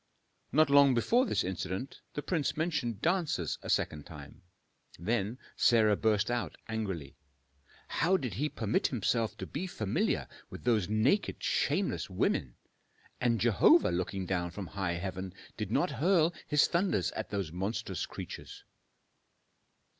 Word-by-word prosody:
Not 155 +1 +4
long 140 -2 +7
before 240 - +3
this - - +1
incident 95 +6 -4 0.2
the 145 - -3
prince 160 -6 -1
mentioned 150 - -1
dancers 175 -1 0
a - - -8
second 75 -2 0
time. 75 +2 -11 0.6
Then 110 +5 -1 0.2
Sarah 110 -3 +4
burst 110 +1 +1
out 120 -1 -2
angrily, 95 -10 -4 0.7
"How 185 +3 +2
did 130 - -4
he 145 +10 -1
permit 110 -4 0
himself 115 -1 0
to - - -5
be 175 +6 -4
familiar 110 - -1 0.2
with - - -9
those 110 -6 +2
naked, 115 - +1
shameless - - 0
women? 60 -3 0 0.6
And 120 -2 +2
Jehovah 115 -6 +5
looking 90 +2 -2
down 90 -2 -1
from 95 +3 -6
high 95 -2 -2
heaven 95 +1 -5 0.2
did - - -4
not - - +1
hurl 170 0 +3
His 150 -1 +4
thunders 170 - +1
at - - -5
those 100 -6 -3
monstrous 95 +6 -3
creatures!" - - -8
110 Hz, 140 wpm, -31 LUFS, 95-145 Hz, 0.7 s, long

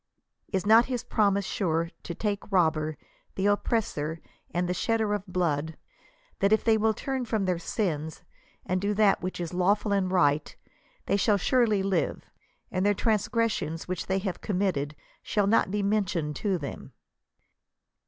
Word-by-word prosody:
Is 190 -3 -1
not 225 +3 +7
his 250 -2 -2
pro 210 -4 +2
mise 200 0 -1
sure, 165 -4 -1
to 170 - -6
tke 205 +1 -2
robber, 160 -4 +2 0.4
the 190 - -1
oppressor, 205 -7 0 0.3
and 175 +1 -1
the 180 - 0
shedder 220 +2 0
of 205 -1 -3
t - - -12
14 180 - 0 0.3
l^lood, 160 - -10 0.6
that 200 +1 +2
if 220 - +4
they 225 -1 +4
will 220 0 +2
turn 265 +2 -3
from 220 -4 -1
their 180 -2 0
sins 160 -5 -3 0.4
and 185 0 -1
do 205 +1 0
that 205 -2 +4
which 185 0 -4
is 175 0 -4
lawful 200 +4 +2
and 195 -2 +1
right, 150 -5 +2 0.5
they 200 - +2
shall 205 +1 +3
surely 215 -1 +2
live, 195 -1 0 0.5
and 185 0 0
their 205 0 +3
transgressions 215 -6 0
which 185 -1 -3
they 190 - +1
have 190 -2 -3
committed 180 -7 -1 0.3
shall 205 -2 0
not 205 -1 +3
be 205 +1 -1
mentioned 185 -7 0
to 195 -3 0
them 145 -4 -7
195 Hz, 170 wpm, -27 LUFS, 175-210 Hz, 0.6 s, not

